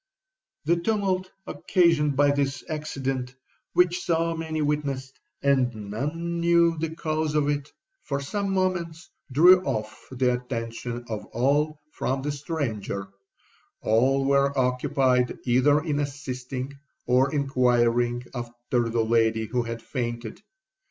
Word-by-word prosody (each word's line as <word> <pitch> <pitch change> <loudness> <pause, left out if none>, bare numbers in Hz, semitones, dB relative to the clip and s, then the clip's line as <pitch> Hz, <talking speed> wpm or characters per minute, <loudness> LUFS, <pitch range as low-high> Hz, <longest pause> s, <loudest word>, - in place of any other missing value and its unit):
'The 170 +3 +3
tumult 185 -1 0 0.2
occasioned 165 -5 +2
by 145 +1 +4
this 140 -1 -1
accident, 135 -5 -3 0.4
which 180 0 +3
so 165 0 +1
many 160 -1 -3
witnessed, 140 -3 -2 0.2
and 130 -4 +2 0.2
none 165 +9 -3
knew 170 0 +4
the 160 0 -3
cause 155 -1 -1
of, 150 -1 +2 0.5
for 140 -1 -3
some 195 +8 -2
moments 175 -3 -1 0.2
drew 180 +7 +7
off 110 -9 -4
the 125 -1 +1
attention 120 -1 -4
of 110 -3 -4
all 145 +5 +1
from 135 +1 -2
the 145 - -1
stranger—all 115 - -2
were 140 0 +2
occupied 125 0 +2
either 130 +4 +4
in 150 -3 -1
assisting 135 -1 -4 0.3
or 130 +2 +3
inquiring 120 -3 +2
after 120 -1 -2
the 115 -1 +1
lady 110 -1 +2
who 125 +3 -1
had 115 -1 -5
fainted. 120 - -4
135 Hz, 120 wpm, -26 LUFS, 120-155 Hz, 0.5 s, drew